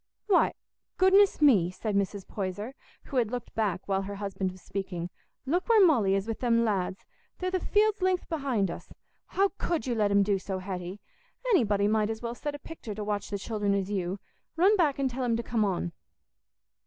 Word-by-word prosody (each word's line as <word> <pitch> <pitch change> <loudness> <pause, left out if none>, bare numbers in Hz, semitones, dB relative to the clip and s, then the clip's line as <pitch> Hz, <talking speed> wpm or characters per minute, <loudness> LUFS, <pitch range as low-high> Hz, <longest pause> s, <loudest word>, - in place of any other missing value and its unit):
"Why, 395 -4 +4 0.4
goodness 380 -3 +5
me," 205 -12 +6
said 200 +3 -3
Mrs. 200 0 -1
Poyser, 205 +5 -4 0.3
who 270 - -5
had 235 -4 +2
looked 245 0 -5
back 200 -5 -1
while 195 -1 +1
her 200 +1 -5
husband 195 -2 -3
was 185 -1 -15
speaking, 180 -3 -4 0.3
"look 350 - 0
where 435 -4 +7
Molly 220 - +4
is 195 +2 -1
with 225 - -3
them 235 -2 +2
lads! 190 -3 -1 0.3
They're 370 0 -2
the 370 - +1
field's 420 +2 +2
length 370 -1 +1
behind 265 - 0
us. - - -9 0.4
How 395 +1 +2
could 335 -9 -1
you 250 - 0
let 210 -3 +2
'em 200 0 +4
do 200 -1 +1
so, 190 0 -4
Hetty? 185 0 -5 0.5
Anybody 205 - +3
might 215 0 +2
as 220 0 -3
well 235 0 -2
set 290 +4 -4
a - - -5
pictur' 275 -8 -8
to 210 - -4
watch 205 -1 -2
the 205 - -2
children 205 -1 -1
as 195 0 -2
you. 185 -1 -1 0.4
Run 380 +6 +5
back 315 -8 +2
and 275 -1 +1
tell 255 +1 -3
'em 235 -2 +1
to 235 - -3
come 225 -1 0
on." 180 -3 -1
215 Hz, 205 wpm, -28 LUFS, 195-280 Hz, 0.5 s, where